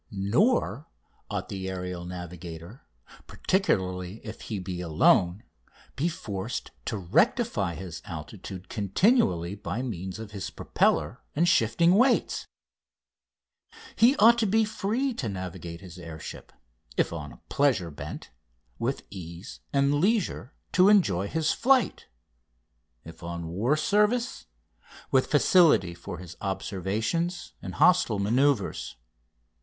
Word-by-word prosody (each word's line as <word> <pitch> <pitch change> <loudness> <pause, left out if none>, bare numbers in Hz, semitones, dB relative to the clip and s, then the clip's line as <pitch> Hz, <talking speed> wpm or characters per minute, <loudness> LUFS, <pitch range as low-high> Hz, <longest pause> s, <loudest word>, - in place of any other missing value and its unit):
Nor 120 - +1 0.4
ought - - -4
the 95 -1 -4
aerial 90 -1 -5
navigator, 90 +3 -8 0.4
particularly 95 - -1
if 110 0 -8
he 110 - -4
be 90 -1 -5
alone, 85 +3 +3 0.5
be 160 +6 0
forced 100 - -5
to 110 - -2
rectify 105 - +1
his 90 -4 -7
altitude 90 +3 -8
continually 100 - +2
by 105 +4 -4
means 95 -6 -5
of 110 -2 -8
his 100 -2 -5
propeller - - 0
and 170 +4 +3
shifting 170 +5 +4
weights. 245 +5 +2 1.5
He 240 +5 +5
ought 235 -2 +7
to 220 - +2
be 220 +3 +3
free 220 +5 -1
to 130 - -3
navigate 90 -3 -6
his 90 -2 -11
air 85 -2 -8
ship; - - -9 0.5
if - - +1
on - - -7
pleasure 120 - +1
bent, 70 - -8 0.5
with 130 +4 -2
ease 85 -1 -9
and 140 0 +3
leisure 195 - 0 0.2
to 185 +2 +5
enjoy 100 - +3
his 160 +5 0
flight; 260 0 +2 1.0
if 80 0 -11
on 85 -1 -5
war 115 - +1
service, 210 +9 +1 0.6
with - - +3
facility 165 - +5
for 85 +1 -8
his 90 -1 -10
observations 100 - -2
and - - -7
hostile 170 - +4
manoeuvres. 115 - +1
105 Hz, 120 wpm, -27 LUFS, -, 1.5 s, ought